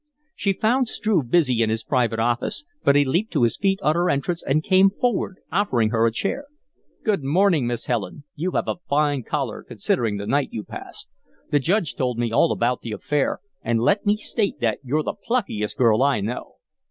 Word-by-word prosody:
She 195 - 0
found 245 +6 +1
Struve 190 - 0
busy 130 -7 +3
in 110 - +2
his 110 0 -1
private 125 -5 +1
office, 120 - -1 0.2
but 140 - +4
he 145 0 +5
leaped 175 +12 0
to 145 -7 +2
his 115 - +3
feet 195 -1 +1
on 150 - +3
her 175 +2 +1
entrance 170 +4 -1
and 155 +3 0
came 190 +2 +5
forward, 205 -2 -1
offering 130 - +1
her 115 0 +3
a - - +1
chair. 200 - -2 0.6
"Good 205 - 0
morning, 160 -2 +3
Miss 120 -1 -3
Helen. 120 +4 -3
You 170 +4 -2
have - - 0
a - - -1
fine 145 -1 +2
color, - - -3
considering 110 -4 -1
the 100 - -5
night 140 +5 +1
you 110 - -5
passed. - - -8 0.4
The 145 - +4
Judge 170 +2 0
told 125 -2 -1
me 120 -1 -1
all - - +3
about 120 +1 0
the 115 - -5
affair; 145 +5 -1 0.2
and 115 0 0
let 195 - +2
me 205 0 +2
state 215 -1 -1
that 110 -3 0
you're 150 +4 0
the - - -2
pluckiest 200 - -2
girl 115 -2 +4
I 140 -4 +3
know." 110 +5 -5
140 Hz, 200 wpm, -23 LUFS, 120-190 Hz, 0.6 s, he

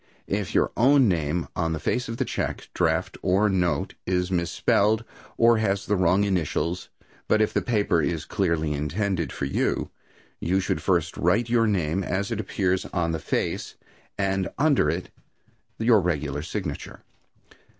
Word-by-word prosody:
If 100 -3 -3
your - - +3
own 135 +1 +5
name 85 -2 0
on 80 -2 0
the 80 - -3
face 125 +11 -1
of 115 - -4
the - - 0
check, - - -3
draft - - 0
or 100 +4 +3
note 90 -3 0
is 90 0 0
misspelled, 100 +5 +2 0.3
or 115 -1 +5
has 100 -3 0
the 105 - +1
wrong 90 +2 +3
initials, 90 -2 -1 0.4
but 110 - +3
if 110 - +2
the - - +1
paper 105 -7 +1
is 80 0 -2
clearly 85 -6 0
intended 85 - -1
for - - -3
you, 70 - -1 0.5
you 95 +3 +1
should 95 - -1
first 85 -3 +1
write 105 +8 +2
your 115 -1 +3
name 95 -2 0
as 100 +3 -2
it 110 - -2
appears 95 -3 0
on 85 -3 -1
the 80 - -2
face, 75 - -2 0.4
and 95 -1 0
under 145 -1 +3
it - - -3 0.7
your 110 -1 +4
regular 75 -5 -1
signature. 85 -2 -5
95 Hz, 160 wpm, -25 LUFS, 85-105 Hz, 0.7 s, own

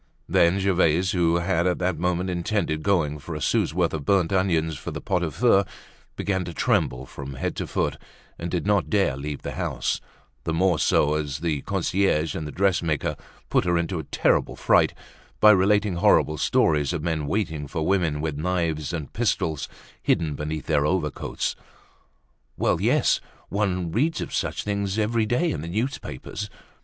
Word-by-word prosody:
Then 85 +3 +4
Gervaise 95 -2 +2
who 85 -2 +2
had 85 0 +1
at 90 - +1
that 90 -1 -1
moment 90 +1 0
intended 85 -3 -1
going 80 -6 +1
for 80 +3 -7
a - - -4
sou's 70 - +1
worth 85 0 0
of 80 -3 -3
burnt 90 +2 +2
onions 85 -4 +1
for - - -7
the - - -5
pot 90 -2 -1
au 85 - 0
feu, 100 +2 +3 0.5
began 95 -2 -1
to 85 -2 -7
tremble 65 -1 +1
from 70 +1 -8
head 65 - -3
to - - -3
foot - - -1 0.4
and 85 - -4
did 90 +1 -2
not 100 -2 +2
dare 100 -11 +2
leave 70 +1 -5
the - - -4
house; - - -2 0.4
the 80 - -1
more 90 -1 +2
so, 75 +1 +3
as 75 -1 -2
the 80 -4 -1
concierge 80 -4 0
and 80 - -4
the - - -6
dressmaker 85 -6 0 0.4
put - - +3
her 85 -1 +2
into 85 +1 -1
a - - -4
terrible - - +1
fright - - +3 0.4
by 105 - +8
relating 100 -1 +3
horrible 75 -3 +3
stories 75 +2 +2
of 80 -3 -3
men 80 -3 -1
waiting 80 -7 -2
for 80 +3 -3
women 85 -6 +1
with 80 -2 -2
knives 85 -2 -1
and 75 -5 -5
pistols 80 -3 -1 0.3
hidden 80 -3 +1
beneath 75 0 -4
their 70 - +2
overcoats. 75 -2 -1 1.0
Well, - - +1
yes! - - +3 0.3
one 90 -4 -1
reads 150 - +1
of - - -5
such - - -1
things 100 -1 -2
every 110 +1 +1
day 125 +10 +1
in 75 - -3
the 80 - -6
newspapers. 105 - -4
85 Hz, 175 wpm, -25 LUFS, 75-95 Hz, 1.0 s, by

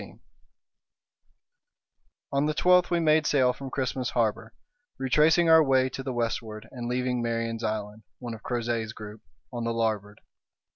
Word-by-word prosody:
CHAPTER - - -10
15 - - -22 2.1
On 140 +1 +2
the 155 - -1
twelfth 180 +1 +4
we 175 -1 +1
made 155 -1 +3
sail 130 -3 +3
from 135 +1 -8
Christmas 130 -2 -2
Harbour 115 -1 -1 0.5
retracing 150 +6 +3
our 160 -1 +7
way 130 -2 +2
to 135 - -6
the 135 0 -4
westward, 115 -2 -3
and 120 -2 -6
leaving 125 0 -1
Marion's 115 0 -2
Island, 110 -1 -3 0.2
one 120 -2 -6
of 110 - -9
Crozet's 115 -2 -2
group, 105 0 -10 0.3
on 120 -1 -4
the 115 0 -1
larboard. 105 -3 -2
120 Hz, 155 wpm, -27 LUFS, 115-135 Hz, 2.1 s, our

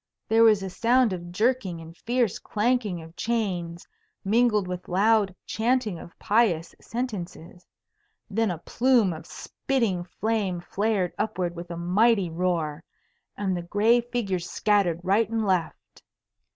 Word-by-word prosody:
There 225 +1 +4
was 215 -3 +5
a 190 - -4
sound 235 +1 +3
of 175 -1 -7
jerking 215 -3 0
and 165 0 -11
fierce 240 0 0
clanking 210 -6 -1
of 165 +1 -14
chains, 180 -8 -2 0.4
mingled 215 -2 +3
with 180 0 -6
loud 200 0 +2
chanting 225 -5 0
of 170 - -13
pious 200 -7 +1
sentences. 185 -7 -6 0.6
Then 220 +1 0
a 175 - -2
plume 235 +1 +2
of 160 - -10
spitting 230 -10 -2 0.2
flame 210 -5 0
flared 200 0 -1
upward 180 -5 -2
with 175 +1 -8
a 170 - -5
mighty 190 +2 +2
roar, 165 -3 -1 0.5
and 195 -2 -1
the 175 - -3
gray 210 +7 +3
figures 200 -8 -3
scattered 200 -6 +1
right 200 +5 +2
and 225 -1 -1
left. 185 -4 -2
200 Hz, 140 wpm, -26 LUFS, 175-225 Hz, 0.6 s, was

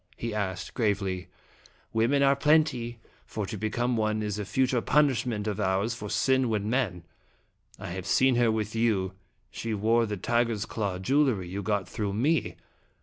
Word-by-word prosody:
he 115 -1 -4
asked, 95 -3 -3
gravely. 100 -5 -1 0.3
" - - -28 0.3
Women 120 +6 +3
are 140 0 +5
plenty, 140 -5 +2 0.3
for 105 -2 -4
to 110 - -5
become 120 +4 -1
one 110 -1 0
is 105 -1 -3
a 105 - -3
future 130 +2 +1
punishment 125 -8 +1
of 105 -2 -2
ours 100 +3 +1
for 105 -3 -7
sin 130 +1 +2
when 105 -2 -1
men. 110 -8 -1 0.7
I - - -7
have 95 +1 -5
seen 130 +5 +4
her 120 -2 +4
with 110 -1 -2
you; 105 -5 +1 0.4
she 115 -1 -3
wore 115 +3 +2
the 105 -1 -3
tiger's 115 +1 0
claw 100 -5 -3
jewelry 115 -3 +1
you 100 +3 -4
got 100 -1 -1
through 105 -4 -3
me. 145 +10 +1
110 Hz, 170 wpm, -28 LUFS, 100-120 Hz, 0.7 s, are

